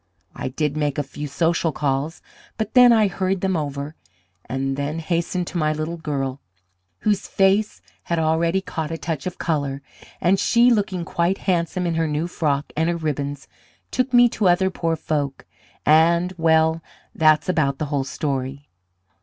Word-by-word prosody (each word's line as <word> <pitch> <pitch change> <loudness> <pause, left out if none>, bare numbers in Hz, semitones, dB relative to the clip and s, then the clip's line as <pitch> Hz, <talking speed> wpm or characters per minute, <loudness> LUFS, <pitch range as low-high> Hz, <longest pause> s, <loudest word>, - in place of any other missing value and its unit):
I - - -4
did 145 +2 -2
make 145 -2 -1
a 145 - 0
few 145 +2 -7
social 165 +2 +1
calls, 145 +2 -2 0.3
but 220 -1 -3
then 250 -1 +8
I 220 -3 +5
hurried 190 0 -1
them 190 -1 0
over; 145 -1 -3 0.5
and 135 +1 -2
then 145 +3 -3
hastened 170 +2 -1
to 175 - -3
my 155 -1 +1
little 155 +2 -4
girl, 140 -4 -3 0.6
whose 205 -2 0
face 195 +2 +1 0.2
had 170 - -1
already 165 +3 +1
caught 160 -5 -4
a 165 - -4
touch 160 -1 -4
of 180 - -5
colour; 140 -4 -2 0.4
and 190 +3 +3
she, 240 +1 +4
looking 195 -6 0
quite 175 +3 0
handsome 180 -1 0
in 170 - 0
her 165 0 0
new 150 +2 -1
frock 150 -5 -1
and 160 +2 +1
her 170 - 0
ribbons, 145 -3 -3 0.4
took 255 0 0
me 245 -1 +7
to 205 -4 +1
other 190 +2 +3
poor 165 -2 -1
folk, 145 -3 -3 0.4
and, 170 +4 +4
well, 160 -1 +3 0.3
that's 155 0 +3
about 155 -7 +1
the 155 - -2
whole 140 -2 +1
story. 135 0 -4
160 Hz, 170 wpm, -22 LUFS, 145-180 Hz, 0.6 s, then